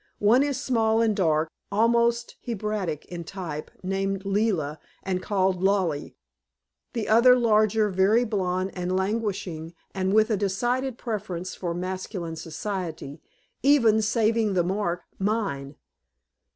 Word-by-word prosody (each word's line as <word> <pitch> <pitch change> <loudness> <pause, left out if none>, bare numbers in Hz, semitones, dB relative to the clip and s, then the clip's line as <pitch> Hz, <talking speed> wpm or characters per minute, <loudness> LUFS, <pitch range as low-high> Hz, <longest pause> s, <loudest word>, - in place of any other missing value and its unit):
One 220 +5 +4
is 280 -2 0
small 225 -5 +2
and 220 -2 +2
dark, 160 -4 +1 0.2
almost 235 +2 +2
Hebraic 210 -8 -3
in 175 -1 -7
type, 165 -4 -6
named 195 +1 -2
Leila 195 -8 0 0.2
and 185 -1 -1
called 190 -2 0
Lollie. 190 -6 0 0.8
The 230 -4 -2
other, 235 +3 +7
larger, 215 -2 +3
very 195 +6 +3
blonde 185 -3 -1
and 180 0 -2
languishing, 190 -5 -2 0.2
and 190 0 0
with 215 +2 +4
a 215 - +2
decided 240 +6 -1
preference 195 -6 -4
for 170 -2 -4
masculine 185 -1 -4
society, 160 -3 -5 0.4
even, 235 -6 +5
saving 220 -1 +1
the 175 - +3
mark, 180 -1 -1 0.2
mine! 195 -10 -1
195 Hz, 125 wpm, -26 LUFS, 180-220 Hz, 0.8 s, other